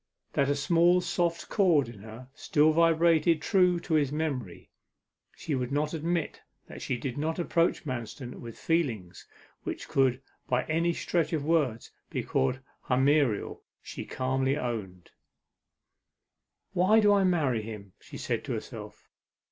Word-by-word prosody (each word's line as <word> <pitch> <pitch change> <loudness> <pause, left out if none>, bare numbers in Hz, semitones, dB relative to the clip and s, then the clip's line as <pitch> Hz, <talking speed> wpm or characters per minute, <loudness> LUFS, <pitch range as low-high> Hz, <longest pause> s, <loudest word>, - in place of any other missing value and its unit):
That 140 0 +2
a 145 - +2
soft 170 +4 +3
small 175 -1 +1 0.2
chord 170 - +3
in 115 -3 -11
her 110 +4 -11
still 150 +1 +2
vibrated 165 0 +3
true 180 0 +3
to 170 - -4
his 145 -3 +2
memory, 140 - -4 0.6
she 155 - -4
would 125 -1 -2
not 150 +2 0
admit: 165 0 -2 0.2
that - - -10
she 125 - -2
did 125 +2 -4
not 160 +2 -1
approach 170 -1 +1
Manston 125 -1 -6
with 115 -2 -9
feelings 115 - -2 0.3
which - - -6
could 130 -2 +2 0.3
by 125 0 +2
any 165 +2 +1
stretch 170 0 -1
of 150 -3 -1
words 145 -8 0 0.2
be - - -3
called 125 - 0 0.3
hymeneal, 135 -3 +2 0.2
she - - -7
calmly 130 +1 -1
owned. 100 -9 -5 1.6
'Why 190 +4 +4
do 205 -1 +5
I 200 -1 +3
marry 150 -11 +1
him?' 105 -3 -9
she - - -11
said - - -2
to - - -3
herself. - - -8
145 Hz, 145 wpm, -28 LUFS, 125-170 Hz, 1.6 s, do